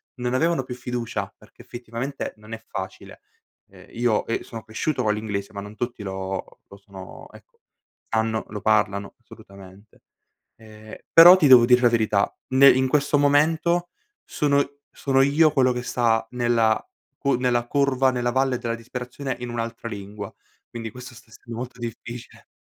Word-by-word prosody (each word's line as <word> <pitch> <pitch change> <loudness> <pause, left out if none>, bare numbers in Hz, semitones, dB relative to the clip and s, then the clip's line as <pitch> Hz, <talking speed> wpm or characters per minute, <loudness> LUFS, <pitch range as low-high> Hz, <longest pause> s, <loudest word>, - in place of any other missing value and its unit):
non 125 -1 -3
avevano 160 +1 +1
più 125 - -7
fiducia, 125 -1 -4
perché - - -18
effettivamente 120 +3 -6
non 105 +1 -12
è 115 0 -8
facile. 95 0 -8 0.5
E - - -17
io, 120 -2 0
ehm, 115 - -1
sono 115 -1 -9
cresciuto 125 +5 -2
con 105 -2 +2
l'inglese, 105 -2 -4
ma 100 - -6
non 105 +1 -10
tutti 120 0 -4
lo 95 -1 -6
lo 100 - -14
sono 100 -2 -12
ecco, - - -19
lo - - -70 0.5
sanno, 110 0 0
lo 105 -2 -6
parlano 100 -2 0
assolutamente. 100 -3 -16 0.6
Ehm, 110 -1 -13 0.2
però 170 +2 +10
ti 165 - +2
devo 125 -3 +8
dire 125 0 +5
la 120 - +5
verità, 110 -3 +1 0.2
nel 135 0 +7
in 130 0 +2
questo 145 +1 +2
momento 160 +4 +2 0.4
sono 140 -1 +1 0.3
sono 135 -1 +1
io 150 +3 +4
quello 130 -3 +3
che 125 0 -4
sta 115 -3 +1
nella 120 -2 +1 0.4
cu 140 -1 +1
nella 120 -1 0
curva, 135 -1 +2
nella 120 -1 -1
valle 130 0 +1
della 115 -1 -3
disperazione 125 +3 -6
in 125 - -5
un'altra 115 0 -5
lingua, 100 -1 -8 0.4
quindi 115 -2 -7
questo 125 +1 -11
stesso 115 -1 -17
molto 125 +2 -7
difficile. 120 0 -8
120 Hz, 160 wpm, -23 LUFS, 110-130 Hz, 0.6 s, però